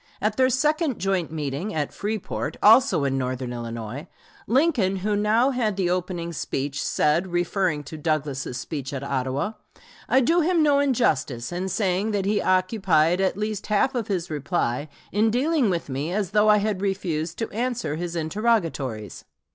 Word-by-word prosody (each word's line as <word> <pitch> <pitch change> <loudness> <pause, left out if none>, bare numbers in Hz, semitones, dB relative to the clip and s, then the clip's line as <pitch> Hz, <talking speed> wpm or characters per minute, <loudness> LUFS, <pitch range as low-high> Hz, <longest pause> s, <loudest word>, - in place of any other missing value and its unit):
At 215 +1 0
their 260 0 +4
second 300 +2 +1
joint 190 -4 -1
meeting, 155 +5 -3
at 150 -2 -2
Freeport, 205 -7 -3
also 225 - +6
in 135 -1 0
northern 125 -1 -3
Illinois, 115 +5 -6 0.4
Lincoln, 250 - +2
who 205 +2 -1
now 220 +6 +3
had 220 -6 -1
the 180 -2 +1
opening 175 -2 -2
speech, 140 -1 -3
said, 155 +5 +1
referring 175 -3 0
to 155 +2 -9
Douglas's 145 -5 -2
speech 140 0 -5
at 135 -1 -4
Ottawa: 135 +6 -1 0.6
"I 260 - +5
do 335 +7 +3
him 335 0 +3
no 290 -2 +4
injustice 155 - 0
in 180 +2 -3
saying 195 +2 0
that 200 -2 0
he 205 +1 +1
occupied 185 -3 +2
at 190 0 +1
least 210 -1 -3
half 210 +5 +2
of 240 -4 -2
his 180 -5 -2
reply 145 -2 -1 0.2
in 215 +3 +3
dealing 265 +1 +2
with 170 -3 -2
me 140 +4 -3
as 195 -1 -1
though 210 +1 +4
I 210 - +7
had 205 -2 -1
refused 175 -5 -2
to 225 - -3
answer 240 -7 -2
his 175 +1 -4
interrogatories. 160 - -1
185 Hz, 165 wpm, -24 LUFS, 150-215 Hz, 0.6 s, I